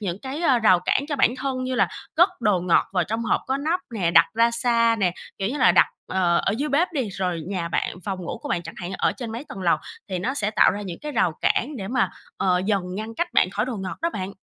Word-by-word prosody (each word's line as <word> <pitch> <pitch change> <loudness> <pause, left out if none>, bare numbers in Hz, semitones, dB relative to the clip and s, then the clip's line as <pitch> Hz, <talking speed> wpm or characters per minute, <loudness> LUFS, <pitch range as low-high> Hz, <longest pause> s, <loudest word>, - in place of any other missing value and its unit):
những 190 -2 -3
cái, 270 +4 -5
ơ, 265 -7 +4
rào 185 -6 +5
cản 270 - +1
cho 290 - -1
bản 265 - +4
thân 255 -1 -3
như 255 0 -2
là - - +3 0.3
cất 350 +4 +6
đồ 210 -6 +2
ngọt 175 -1 +3
vào 180 -3 +1
trong 225 +4 -3
hộp - - +1
có 265 +1 0
nắp 320 +6 -1
nè, 175 -5 +1
đặt - - +7
ra 230 +1 +4
xa 235 -1 +2
nè, 180 -3 +2 0.3
kiểu 195 +1 -1
như 285 +4 -3
là, 185 - +5
đặt, - - +6 0.2
ờ, 180 -2 +1
ở - - 0
dưới 300 +1 -1
bếp 320 +6 +2
đi, 260 -8 -1
rồi 180 -3 -2
nhà 175 -4 -2
bạn, 175 - -2
phòng 195 -2 -3
ngủ 170 - -5
của - - -6
bạn 175 - -1
chẳng 165 - -9
hạn, 180 +1 -6
ở - - +2
trên 230 -4 -6
mấy 240 +6 -6
tầng 195 - -8
lầu 170 - +3 0.3
thì 185 -2 -2
nó 255 +9 -2
sẽ 210 -5 0
tạo 215 - +5
ra 205 +2 -4
những 185 -4 -6
cái 300 -1 -5
rào 180 -8 +2
cản 285 +4 +1
để 195 -4 -5
mà, 250 +2 +1 0.3
ờ, 180 -1 +1
dần 200 -3 +1
ngăn 220 +2 -5
cách 345 +5 -1
bạn 180 - +3
khỏi 205 +2 -1
đồ 255 - -3
ngọt 190 -2 -5
đó 335 - +1
bạn. 195 - -5
215 Hz, 280 wpm, -24 LUFS, 185-260 Hz, 0.3 s, đặt